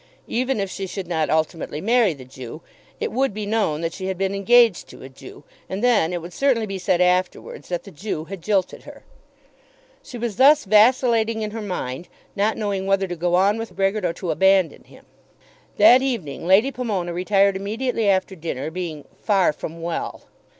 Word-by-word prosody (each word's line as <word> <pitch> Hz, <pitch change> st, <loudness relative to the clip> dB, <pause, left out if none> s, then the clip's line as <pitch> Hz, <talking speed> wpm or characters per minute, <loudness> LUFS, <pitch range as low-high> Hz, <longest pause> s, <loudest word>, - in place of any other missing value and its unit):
Even 255 Hz, 0 st, -1 dB
if 195 Hz, -, -1 dB
she 195 Hz, -1 st, -5 dB
should 190 Hz, 0 st, -5 dB
not 160 Hz, -3 st, -1 dB
ultimately 155 Hz, -1 st, -1 dB
marry 225 Hz, -2 st, +2 dB
the 130 Hz, -2 st, -12 dB
Jew, 130 Hz, +4 st, -10 dB, 0.4 s
it -, -, -2 dB
would 260 Hz, -3 st, 0 dB
be 210 Hz, -1 st, -4 dB
known 205 Hz, -8 st, 0 dB
that 165 Hz, 0 st, -3 dB
she 190 Hz, -1 st, -5 dB
had 190 Hz, -1 st, -3 dB
been 195 Hz, +1 st, -1 dB
engaged 225 Hz, +1 st, +4 dB
to -, -, -13 dB
a 130 Hz, -, -9 dB
Jew, 135 Hz, +2 st, -13 dB, 0.3 s
and 195 Hz, +4 st, -4 dB
then 230 Hz, -9 st, +3 dB
it 175 Hz, -2 st, -4 dB
would 175 Hz, +1 st, -9 dB
certainly 255 Hz, -3 st, +1 dB
be 195 Hz, -2 st, -5 dB
said 180 Hz, -1 st, +1 dB
afterwards 180 Hz, +1 st, -1 dB
that 175 Hz, -1 st, -3 dB
the 195 Hz, -, -12 dB
Jew 160 Hz, -1 st, -5 dB
had 190 Hz, +2 st, -9 dB
jilted 195 Hz, +1 st, -1 dB
her. -, -, -13 dB, 1.0 s
She 245 Hz, -, -10 dB
was 235 Hz, -3 st, -4 dB
thus 285 Hz, +2 st, +6 dB
vacillating 225 Hz, +1 st, +3 dB
in 210 Hz, -, -4 dB
her 225 Hz, +1 st, -5 dB
mind, 175 Hz, -6 st, -5 dB, 0.3 s
not 210 Hz, +2 st, 0 dB
knowing 200 Hz, -3 st, -2 dB
whether 195 Hz, 0 st, +1 dB
to 175 Hz, -, -5 dB
go 175 Hz, +1 st, 0 dB
on 200 Hz, +4 st, +3 dB
with 225 Hz, -, -7 dB
Brehgert 195 Hz, +2 st, 0 dB
or 175 Hz, -2 st, 0 dB
to 175 Hz, -2 st, -4 dB
abandon 190 Hz, -2 st, +2 dB
him. -, -, -18 dB, 0.7 s
That 260 Hz, -5 st, +7 dB
evening 185 Hz, -, -3 dB
Lady 210 Hz, +9 st, +4 dB
Pomona 205 Hz, -9 st, -3 dB
retired 195 Hz, +2 st, +2 dB
immediately 220 Hz, +3 st, -1 dB
after 190 Hz, 0 st, +1 dB
dinner, 155 Hz, -3 st, -5 dB
being 165 Hz, -4 st, -6 dB, 0.2 s
"far 195 Hz, -6 st, +2 dB
from 165 Hz, +2 st, -8 dB
well." 170 Hz, -1 st, -4 dB
195 Hz, 190 wpm, -22 LUFS, 175-220 Hz, 1.0 s, That